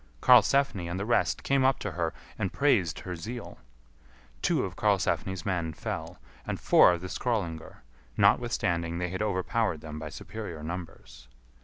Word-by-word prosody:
Karlsefni 125 - +4
and 90 +2 -3
the 100 - -2
rest 120 +1 +1
came 135 -1 +2
up 135 0 +3
to 105 - -4
her 85 -2 -1 0.3
and 95 - -1
praised 105 - +2
her 90 -1 -5
zeal. 115 +9 -7 0.8
Two - - +1
of - - -7
Karlsefni's 95 -3 0
men 85 -5 -1
fell, - - -5 0.3
and - - -4
four 90 - +6
of 85 - -4
the 90 - -5
Skrœlingar, 90 -7 -3 0.4
notwithstanding 85 -1 +2
they 90 0 -2
had 95 +3 -4
overpowered 105 -2 0
them 75 -1 -7
by 80 0 -6
superior 85 -4 -7
numbers. 80 -8 -8
90 Hz, 155 wpm, -28 LUFS, 85-110 Hz, 0.8 s, four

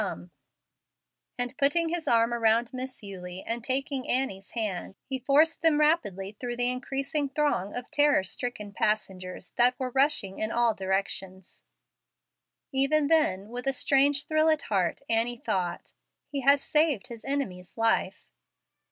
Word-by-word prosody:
Come;" - - -5 1.1
and 245 0 -4
putting 320 +4 +2
his 340 -1 -3
arm 230 0 +3
around 230 +1 +1
Miss 255 -2 -7
Eulie 185 -2 -8
and 230 0 -3
taking 265 +1 -1
Annie's 200 -7 -1
hand, 205 -5 -3
he 265 -1 -3
forced 290 +5 +3
them 320 -2 +4
rapidly 210 - 0
through 240 -1 -4
the 245 0 +3
increasing 275 +3 -2
throng 275 -9 -1
of 245 0 -7
terror 290 -8 +4
stricken 210 +1 -3
passengers 190 -4 -2
that 245 +1 +4
were 255 -1 -3
rushing 265 -8 +1
in 215 0 -2
all 235 -1 +2
directions. 190 -1 -4 1.1
Even 285 +2 +3
then, 210 -12 +2
with 245 +2 -6
a 270 - +2
strange 280 +2 +3
thrill 310 0 +2
at 310 -1 +1
heart, 190 +3 -1
Annie 230 +2 +1
thought, 180 -6 -3 0.4
"He 280 -1 -3
has 280 +1 +4
saved 300 -8 +2
his 230 -2 -9
enemy's 195 -11 -3
life." 225 0 0
245 Hz, 145 wpm, -27 LUFS, 205-280 Hz, 1.1 s, them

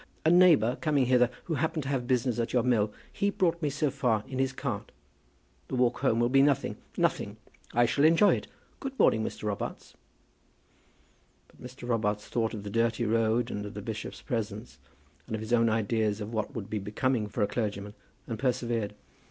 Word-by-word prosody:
A 160 - +5
neighbour 165 -10 +5
coming 145 -5 +2
hither, 125 -1 +4
who 170 - -3
happened 160 +1 -1
to 135 - -4
have 130 -3 -1
business 125 -2 +1
at 115 - -2
your 125 -2 +3
mill, 110 -4 +2 0.2
he 200 - +1
brought 170 -4 0
me 150 - +1
so 145 +1 0
far 125 -6 +1
in 130 -1 -5
his 135 -1 +1
cart. 130 - -4 0.8
The - - -3
walk 125 -1 +2
home 120 -4 +2
will 120 - +3
be 135 +2 +4
nothing, 140 -2 +2 0.2
nothing. - - 0 0.3
I 120 +1 +4
shall 140 +5 +1
enjoy 165 +6 +6
it. - - -8 0.3
Good 270 0 -6
morning, 110 - +4
Mr. - - -5
Robarts." 105 -2 -4 1.5
But - - -22
Mr. 125 0 -9
Robarts 105 -3 0
thought 115 -2 -1
of 105 - -7
the 100 - -6
dirty 115 +1 +1
road, 115 +2 +1
and 105 - -3
of 105 -1 -8
the 105 - -5
bishop's 110 0 -6
presence, 110 -1 -4 0.5
and 110 - -3
of - - -4
his 110 +2 -3
own 115 -1 +4
ideas 110 -1 0
of 105 +2 -6
what 110 +5 -2
would 105 -4 -4
be 105 0 -2
becoming 105 +3 -1
for 105 +1 -1
a - - +2
clergyman, 105 -2 -3 0.3
and 115 -2 -5
persevered. 120 -5 -1
120 Hz, 195 wpm, -29 LUFS, 110-135 Hz, 1.5 s, enjoy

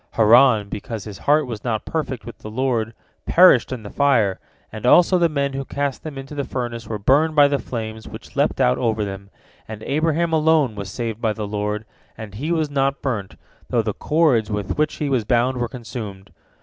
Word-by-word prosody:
Haran, 115 -1 +5
because 105 +1 -6
his 105 -3 -9
heart 150 0 +4
was 115 -5 -7
not 110 -3 -2
perfect 135 -7 -3
with 120 - -10
the 110 - -8
Lord, 115 -2 -1 0.3
perished 170 -10 +6
in 125 -4 -5
the 105 - -9
fire, 120 -9 +2 0.3
and 110 -1 -8
also 180 +6 +5
the 170 -1 +3
men 140 -2 -1
who 135 0 -3
cast 140 0 -3
them 155 -3 -7
into 135 +2 -8
the 145 -1 -2
furnace 120 -4 -5
were 110 - -3
burnt 145 +9 +2
by 145 -1 +7
the 140 -1 0
flames 110 -2 -6
which - - -11
leapt - - +1
out 65 - +3
over 110 -2 0
them, 100 0 -7 0.4
and 110 0 -8
Abraham 160 +3 0
alone 155 -5 +3
was 100 -2 -6
saved 115 +2 -4
by 110 -2 +1
the 105 -1 -5
Lord, 105 +1 -3 0.3
and 110 -3 -8
he 145 +11 -4
was 160 -2 +1
not 140 0 0
burnt, 110 -8 -3 0.3
though - - +1
the - - -2
cords 150 -9 +2
with 105 -3 -3
which 150 0 0
he 150 - -3
was 130 -5 +1
bound 125 +3 +1
were 120 -1 -1
consumed. 110 - -8
120 Hz, 205 wpm, -21 LUFS, 110-140 Hz, 0.4 s, by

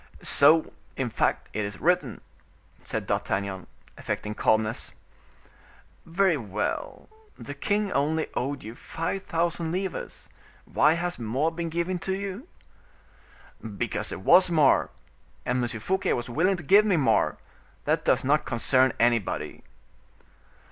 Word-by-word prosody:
'" - - -21
"So, 160 0 +5 0.2
in 125 -3 -2
fact, - - 0
it 105 - -1
is 100 0 -6
written," 155 -8 +1 0.6
said - - -3
D'Artagnan, 95 -1 -2 0.3
affecting 105 - -3
calmness. 110 +1 0 1.1
"Very 175 -1 +2
well; 105 -4 -4 0.3
the 145 - -7
king 205 +8 -1
only 155 +3 +1
owed 140 +2 -3
you 110 +2 -7
five 165 +9 -4
thousand 170 -2 -1
livres; 190 +1 -4 0.4
why 155 - +3
has 175 -1 -3
more 130 +8 0
been 170 0 -4
given 170 +2 -2
to 190 - -2
you?" 200 - -6 1.3
"Because - - -2
there - - -4
was 180 - +5
more; 155 -5 +4 0.6
and 125 0 0
M. 120 -1 -3
Fouquet 190 - 0
was 120 0 -4
willing 180 +8 +2
to 175 - -8
give 200 +8 +6
me 200 -5 +2
more; 140 - +2 0.5
that - - +1
does - - +2
not 145 +3 +2
concern 130 +1 +2
anybody." 115 -3 0
155 Hz, 135 wpm, -26 LUFS, 120-180 Hz, 1.3 s, give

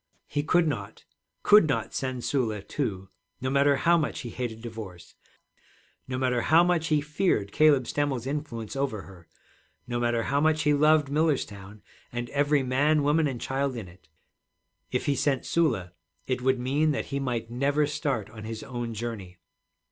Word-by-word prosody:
He 145 - -2
could 165 +2 +2
not, 105 -7 -5 0.4
could 210 -5 +7
not 145 - -1
send 130 -2 -3
Sula, 110 -7 -1
too, 95 -9 -3 0.3
no 130 0 -2
matter 140 +1 +4
how 170 +5 +3
much 150 - -2
he 120 - -7
hated 120 -3 -4
divorce, 105 -7 -9 0.9
no 130 -1 -3
matter 125 -2 +1
how 160 +6 +5
much 175 -2 +1
he 150 -2 +2
feared 145 - 0
Caleb 145 -4 +4
Stemmel's 140 -4 -1
influence 135 -6 -4
over 135 -7 -2
her, 90 -3 -15 0.6
no 120 -1 -2
matter 120 -1 +1
how 140 +4 0
much 155 0 +2
he 150 -1 +3
loved 150 -1 +4
Millerstown 105 -10 -1 0.3
and 120 0 -4
every 145 0 +2
man, 145 +4 +2
woman, 150 +2 +3
and 130 -4 -4
child 135 +1 -1
in 110 -6 -6
it. 85 -3 -18 0.8
If - - -1
he 140 - +1
sent 135 -2 0
Sula, 110 - 0 0.3
it 130 -1 -2
would 130 +1 +2
mean 140 +5 +1
that - - -2
he 140 - 0
might 120 -4 -3
never 140 +4 +1
start 140 -7 -2
on 110 -1 -10
his 110 0 -6
own 120 -3 -5
journey. 105 -5 -6
130 Hz, 170 wpm, -27 LUFS, 115-145 Hz, 0.9 s, could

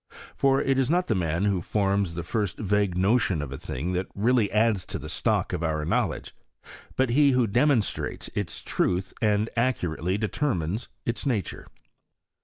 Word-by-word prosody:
For 135 0 +3
it 135 0 +1
is 130 -1 +1
not 180 +3 +2
the - - +1
man 85 -1 0
who 100 -3 +1
forms 100 -2 0
the 85 - -3
first 100 +2 -2
vague 100 -3 0
no 100 +7 +4
tion 90 -7 0
of 75 -2 -4
a 70 - -5
thing 80 +8 -4
that 90 +1 -1
really 115 0 +2
adds 105 -2 +2
to - - -4
the - - -8
stock - - 0
of - - -2
our 80 -2 -1
knowledge, - - -1 0.6
but 130 -2 +1
he 140 +1 +5
who 125 -1 +3
demonstrates 120 +1 +1
its 100 -5 -4
truth 90 +1 0
and 105 -1 +2
accurately 95 -7 0
determines 105 - -1 0.2
its 120 +4 -2
nature. 105 - -2
105 Hz, 175 wpm, -26 LUFS, 90-120 Hz, 0.6 s, he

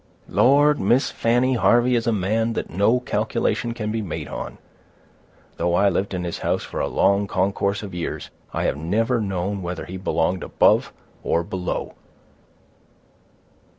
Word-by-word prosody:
"Lord, 145 +3 +4
Miss 120 +7 +2
Fanny, 120 +3 +2
Harvey 120 0 +3
is 115 -1 0
a - - +3
man 110 +3 0
that - - -4
no 100 +8 +3
calculation 115 0 -1
can 110 -2 -3
be 110 0 -1
made 95 -7 -5
on. - - -6 1.0
Though 85 +1 +1
I 100 +2 +4
lived 95 +1 -1
in 90 - -3
his 85 -1 -4
house - - -1
for - - -6
a - - 0
long 100 +1 +2
concourse 100 +1 0
of 100 -3 -7
years, 85 -1 -5 0.2
I - - -2
have - - 0
never 110 - 0
known 95 0 -2
whether 90 0 -5
he 95 - -7
belonged 90 -1 0
above - - +3 0.3
or 85 - 0
below. 90 +1 -4
100 Hz, 155 wpm, -23 LUFS, 90-115 Hz, 1.0 s, Lord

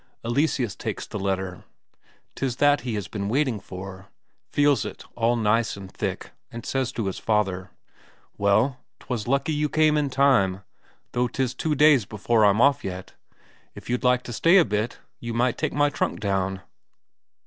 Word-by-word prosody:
Eleseus 125 - 0
takes - - -4
the 105 - -6
letter, 95 -2 -3 0.7
'tis 130 -3 -2
that 145 0 +3
he 120 -2 -3
has 105 -3 -4
been 100 -2 -4
waiting 130 -3 +1
for. 95 0 -9 0.4
Feels 145 -6 +3
it - - -7
all 120 +1 +2
nice 115 -1 +1
and 95 -1 -10
thick, - - -4 0.2
and 115 0 -8
says 135 -2 -1
to 115 - -3
his 95 - -3
father: 95 -4 0 0.7
"Well, 110 +6 +2 0.2
'twas 120 -4 -4
lucky 140 +4 +1
you 150 0 0
came 155 0 +3
in 145 -2 +1
time 130 -9 +2 0.5
though 125 0 +1
'tis 130 +1 -2
two 150 +4 -1
days 145 -6 +5
before 110 +2 +1
I'm 100 +1 +4
off 140 +1 +4
yet. 95 -1 -6 0.6
If - - -8
you'd 125 - -1
like 125 0 +3
to 120 - -7
stay 170 +10 +5
a 175 - +6
bit, 105 +3 -2 0.2
you 115 -1 -5
might 120 0 +2
take 155 - 0
my 145 0 +2
trunk - - -2
down." 95 -2 -1
120 Hz, 170 wpm, -25 LUFS, 100-140 Hz, 0.7 s, a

